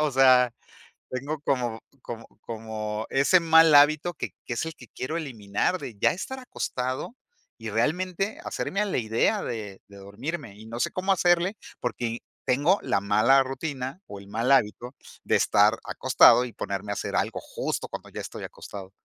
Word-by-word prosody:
O 150 -1 +2
sea, 130 -2 +6 0.6
tengo 140 +4 -4
como 120 -6 -1 0.2
como 115 -1 -7 0.2
como 110 -1 -5
ese 140 +7 +4
mal 160 -2 +6
hábito 155 +4 +5
que - - -5
que 120 - -3
es 120 - -2
el 160 - -6
que 125 - -14
quiero 155 +6 -4
eliminar 120 - -1
de 120 - -8
ya - - +4
estar 260 +9 -6
acostado 130 - -4 0.4
y 115 -1 -6
realmente 180 - -1
hacerme 195 - -3
a - - +1
la 200 - -1
idea 110 -2 +1
de 105 -4 -6
de 100 - -13
dormirme. 105 +5 -6
Y 110 - -12
no 115 +1 -6
sé - - 0
cómo 190 +2 -1
hacerle, 180 +2 +2 0.2
porque 120 0 -2
y 115 +1 -5 0.3
tengo 145 +10 +3
la 100 - +1
mala 110 +7 +4
rutina 135 +3 -4
o 100 - -9
el 100 - -14
mal 115 +6 0
hábito 120 +1 +2 0.3
de - - +2
estar 105 +2 +4
acostado 125 - +5
y 120 - -9
ponerme 100 +1 -4
a - - 0
hacer - - -4
algo - - 0
justo - - -4
cuando - - -8
ya - - -6
estoy - - -8
acostado. 95 -2 -9
125 Hz, 180 wpm, -26 LUFS, 110-160 Hz, 0.6 s, sea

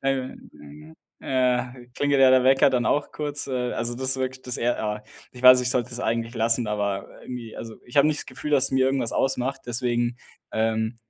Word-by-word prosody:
äh, 135 -1 0
äh, - - -11 0.9
äh, 125 -1 -1
klingelt 145 -1 +1
ja 130 -1 +7
der 130 -1 +5
Wecker 135 +1 +5
dann 125 -2 0
auch 145 0 0
kurz, 145 -1 -4
äh. 125 -2 -2
Also, 120 +1 -3
das 130 +1 -1
wirkt 130 0 -4
das 125 - -3
eher 120 0 -1
a 105 0 -3 0.3
ich 125 - -12
weiß, 130 0 +9
ich 125 0 +1
sollte 125 -1 0
es 120 0 -6
eigentlich 115 0 -2
lassen, 115 +1 +1
aber 100 -2 -2
irgendwie, 120 -3 -8
also 115 -1 -8
ich 120 - -12
habe 140 +1 +6
nicht 155 -1 0
das - - -9
Gefühl, 150 - -6
dass 140 -3 +4
es - - -4
mir 130 0 +3
irgendwas 135 -3 0
ausmacht, 135 0 -1
deswegen, 120 0 -1 0.4
ähm, 110 +1 0
125 Hz, 210 wpm, -24 LUFS, 120-130 Hz, 0.9 s, weiß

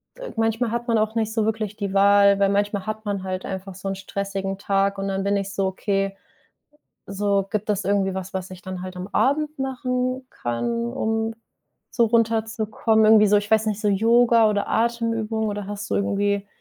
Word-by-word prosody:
äh, - - -8
manchmal 225 +1 0
hat 240 +1 -3
man 230 - +2
auch 215 +1 0
nicht 220 -1 -1
so 220 -2 +1
wirklich 215 -2 -2
die 200 -2 -3
Wahl, 200 0 +5
weil 200 -1 +3
manchmal 205 0 0
hat 215 0 -5
man 200 -2 -2
halt 185 0 -4
einfach 190 0 -6
so 190 +1 -7
'n 195 - -2
stressigen 195 0 -4
Tag 195 0 0
und 195 0 -3
dann 195 0 -2
bin 200 0 +1
ich 195 0 -4
so: 195 -1 0
„Okay“, 195 +1 -1 0.9
so, 200 0 0
gibt 215 0 -2
es 205 -1 -1
irgendwie 195 -1 +1
was, 190 0 -6
was 185 0 -4
ich 185 -1 -10
dann 185 -1 -6
halt 185 0 -7
am 180 +1 -6
Abend 295 +7 0
machen 255 -1 -2
kann, 235 - -2
um 225 -3 -1 0.6
so 235 - +2
runterzukommen? 220 -1 +1
Irgendwie 215 -1 +7
so, 205 - +5
ich 205 0 -1
weiß 220 0 +3
nicht, 210 -1 -1
so 210 - +1
Yoga 230 +2 +4
oder 205 -1 -1
Atemübung 230 -1 0
oder 205 -1 -4
hast 205 +1 -6
du - - +1
irgendwie 200 0 0
205 Hz, 200 wpm, -23 LUFS, 195-225 Hz, 0.9 s, Irgendwie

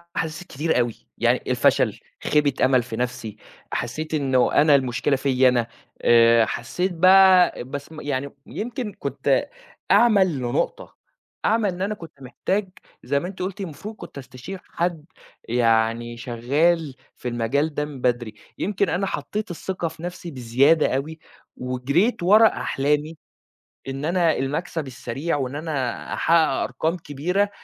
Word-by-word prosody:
أحاسيس 160 +1 -3
كتيرة 150 +1 0
أوي، 120 -2 0 0.2
يعني - - +2
الفشل، - - +2 0.2
خيبة 150 -2 +2
أمل 130 -2 +3
في 115 -1 -6
نَفْسي، 120 -3 -4 0.3
حسّيت 155 +7 -4
إنّه 130 -4 +2
أنا 150 -1 +5
المشكلة 135 +1 +1
فيَّ 130 -1 +3
أنا، 120 -2 +1 0.3
آآ 115 -1 +6
حسّيت 180 - -2
بقى 185 -3 +6
بس 140 +4 -7
م 155 - -9
يعني 140 -1 -2 0.2
يمكن 235 -1 -5
كنت - - 0 0.4
أعمى 215 -5 +6
لنقطة، 150 - -2 0.5
أعمى 220 -2 +2
إن 180 0 -5
أنا 205 +2 0
كُنت 165 -6 -13
محتاج، 190 +10 -2 0.3
زي 140 +2 +1
ما 175 - -5
أنتِ 190 0 -8
قُلتِ 190 +2 -4
المفروض 195 +5 -7
كنت - - -11
أستشير 135 +8 -8
حد، 170 -3 -3 0.4
يعني 115 0 +1
شغّال 135 +6 0 0.2
في - - -7
المجال 125 +6 0
ده 150 - -1
من 140 -4 -9
بدري، 120 -3 0 0.2
يمكن 200 0 0
أنا 195 +2 0
حطّيت 210 0 -4
الثّقة 175 0 -3
في 160 0 -10
نَفْسي 175 -1 -6
بزيادة 130 +4 +3
أوي، 155 +4 -4 0.4
وجرِيت 140 - 0
ورا 215 +5 +7
أحلامي، 150 -1 -1 0.7
إن 135 +2 -4
أنا 170 -1 +2
المكسب 150 +2 -3
السريع 135 +5 -3
وإن 130 0 -3
أنا 145 -6 -3
أحقّق 170 +1 +3 0.3
أرقام 165 +3 -2
كبيرة، 175 +6 -1
150 Hz, 140 wpm, -23 LUFS, 125-180 Hz, 0.7 s, ورا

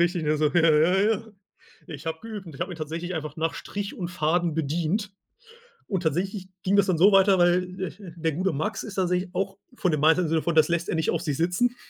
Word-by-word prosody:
Richtig, 175 0 +1
ne, 150 0 +1
so: 155 - +3
„Ja, 165 -1 +5
ja, 160 +5 +4
ja. 220 +1 -5 0.6
Ich 150 +1 -9
habe 160 0 -2
geübt.“ 215 -4 -7
Und 160 - -10
ich - - -12
habe 180 +1 -2
ihn - - -8
tatsächlich 165 +3 -4
einfach 155 -1 -5
nach 160 +1 -1
Strich 205 0 -5
und 175 - -4
Faden 170 0 0
bedient. 170 +7 -1 0.8
Und 190 -4 -1
tatsächlich 185 +5 -2 0.2
ging 190 +2 +2
das 200 -1 +5
dann 180 - +1
so 195 +5 +6
weiter, 195 0 +5
weil, 180 +1 +2
äh, 185 - -2 0.2
der 165 -1 -1
gute 185 +4 -1
Max 160 +10 -2
ist 205 -4 -8
tatsächlich 180 0 0
auch 195 +1 -2 0.2
von 185 -7 0
dem 155 - 0
Mindset, 160 +4 +4
in - - 0
dem 155 - -2
Sinne 160 -1 +1
von 170 -1 -1
das 155 0 +5
lässt 170 0 -1
er - - 0
nicht 160 0 0
auf - - -1
sich 150 -6 -2
sitzen, 180 +9 +1
175 Hz, 245 wpm, -25 LUFS, 160-190 Hz, 0.8 s, so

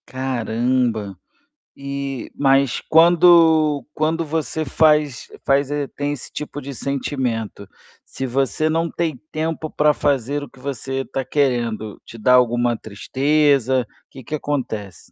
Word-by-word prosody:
Caramba. 120 -4 -1 0.6
E 140 -2 -5
mas 135 -2 +2
quando 165 -3 +5
quando 160 +2 0
você 160 0 -2
faz 150 -3 +2 0.2
faz 140 0 +2
eh, 145 -1 -1
tem 145 +1 -3
esse 145 -4 -7
tipo 150 -1 -6
de 140 0 -7
sentimento, 125 -7 -3 0.4
se 135 - -5
você 135 +3 0
não 165 +1 0
tem 165 -5 -2
tempo 160 0 -3
pra 150 0 +3
fazer 145 0 0
o - - -9
que - - -19
você 135 0 -4
está 135 0 -4
querendo, 120 -7 -1
te 115 - -11
dá 125 +3 +3
alguma 120 -1 +3
tristeza, 130 +3 +1 0.2
que 135 - -11
que 150 - -4
acontece? 110 - -4
140 Hz, 130 wpm, -21 LUFS, 125-150 Hz, 0.6 s, quando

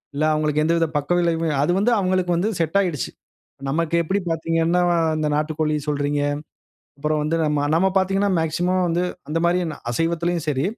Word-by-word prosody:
இல்ல 150 - 0
அவங்களுக்கு 150 0 +1
எந்தவித 165 +1 +2
பக்கவிளைவுமே 165 +2 +1
அது 150 +5 +2
வந்து 235 +4 +2
அவங்களுக்கு 185 -2 0
வந்து 180 +6 +1
செட்டாகிடுச்சு. 170 -2 0 0.6
நமக்கு 165 +3 0
எப்படி 190 +5 0
பார்த்தீங்கன்னா, 165 +2 +1 0.3
அந்த 155 -1 0
நாட்டுக்கோழி 155 0 0
சொல்றீங்க. 145 0 0 0.8
அப்புறம் 150 +1 0
வந்து 155 +2 0 0.4
நம்ம 190 +3 +3
பார்த்தீங்கன்னா 195 +1 +2
மேக்ஸிமம் 180 +3 0
வந்து 170 +1 0 0.3
அந்த 160 - 0
மாரி 175 +1 +2 0.3
அசைவத்துலேயும் 165 +3 -1
சரி, 135 -1 0
165 Hz, 140 wpm, -22 LUFS, 155-175 Hz, 0.8 s, நம்ம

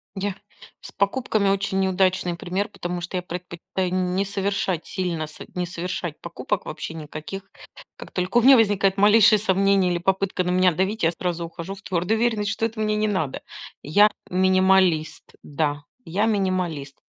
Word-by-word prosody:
Я 195 0 -2 0.5
С - - -10
покупками 200 -1 0
очень 195 0 0
неудачный 185 -2 +1
пример, 185 +4 -3
потому 175 -2 -5
что 175 +2 -4
я 180 - -3
предпочитаю 180 +1 -5
не 185 +1 0
совершать 195 -3 -2
сильно, 175 -4 -3
со 155 - -11
не 180 0 -1
совершать 175 -2 -5
покупок 170 0 -3
вообще - - -6
никаких. 155 +5 -8 0.5
Как - - -11
только 185 +5 -1
у - - +6
меня 265 +3 +8
возникает 200 -4 +3
малейшие 210 +1 +6
сомнения 195 -1 +2
или 175 - 0
попытка 190 +1 0
на 180 - -1
меня 185 0 +4
давить, 190 +6 -1
я 165 - +4
сразу 175 0 -3
ухожу 170 +3 -7
в 195 - -12
твердую 190 +4 -1
уверенность, 220 -4 +1
что 220 +3 -1
это 225 0 -4
мне 215 0 +1
не 215 0 +1
надо. 175 -10 -2 0.4
Я- 205 +8 +4 0.2
минималист, 185 -3 +2
да, 145 0 -2 0.2
я- 195 +6 0
минималист, 185 -9 -1
185 Hz, 165 wpm, -23 LUFS, 175-200 Hz, 0.5 s, меня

